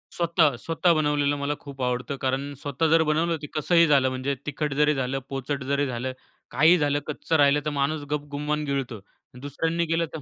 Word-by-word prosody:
स्वतः, 170 -2 +3
स्वतः 165 +1 +2
बनवलेलं 145 -2 +1
मला 145 +1 -1
खूप 140 -2 -9
आवडतं, 125 +2 -2
कारण 135 +2 -1
स्वतः 145 +3 -1
जर 165 0 +5
बनवलं, 165 +2 +1
तर - - -4
कसंही 170 +2 +4
झालं 135 -3 +4
म्हणजे 130 +2 -2
तिखट 150 0 -2
जरी 150 0 +4
झालं, 135 +1 -2
पोचट 135 +1 -3
जरी 140 0 +2
झालं, 125 +1 -4 0.4
काहीही 160 +6 +5
झालं, 145 -2 +1
कच्चं 155 +2 -2
राहिलं, 145 +1 +4
तर - - +1
माणूस 145 +2 0
गपगुमान 150 +1 -2
गिळतो. 135 -5 -3 0.4
दुसऱ्यांनी 165 +4 -1
केलं, 165 +1 +1
तर 160 - -4
145 Hz, 180 wpm, -25 LUFS, 140-155 Hz, 0.4 s, जर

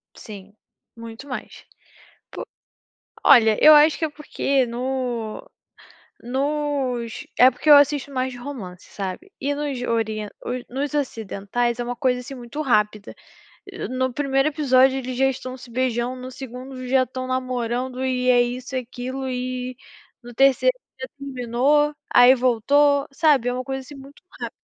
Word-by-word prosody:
Sim, 205 -1 -11 0.4
muito 230 +4 -10
mais. 255 - -8 0.7
Pu - - -7 0.8
olha, 225 -6 +6
eu 310 0 +10
acho 300 +1 +5
que 320 - -1
é 310 - -2
porque 275 -3 -1
no 245 - -4 0.8
nos 265 -3 -2
é 255 +1 +8
porque 265 +4 -10
eu 295 - +11
assisto 285 -1 +3
mais 260 -1 -2
de 245 - -9
romance, 230 -9 -8
sabe. 200 - -6
E 285 +2 0
nos 285 -4 -3
orien 220 -3 -2 0.4
nos 275 +3 -3
ocidentais, 235 -2 -2
é - - -1
uma 245 +1 -4
coisa 250 -2 0
assim 265 +2 -8
muito 245 +5 -6
rápida. 210 -6 0 0.6
Eh, - - -5
no 260 0 -1
1º 270 0 +1
episódio 265 -3 +3
eles 255 -1 -5
já 270 +1 +3
estão 255 0 -6
se 250 -1 -13
beijando, 250 0 -1
no 255 0 -7
2º 255 0 -8
já 260 0 +3
estão 255 0 -6
namorando 255 0 -2
e 255 -1 0
é 245 -1 +5
isso 250 +2 -4
e 255 - +1
aquilo 255 +2 -6
e, 250 0 -4 0.5
no 240 - -11
3º 275 - +4 0.3
já 260 - -5
terminou, 275 +3 +1 0.2
aí 245 +1 +8
voltou, 280 +4 +2
sabe. 275 -4 +3
É - - -2
uma 255 +1 -3
coisa, 265 0 -4
assim, 280 +3 -12
muito 275 +3 -14
rápida. - - -6
255 Hz, 155 wpm, -22 LUFS, 245-275 Hz, 0.8 s, eu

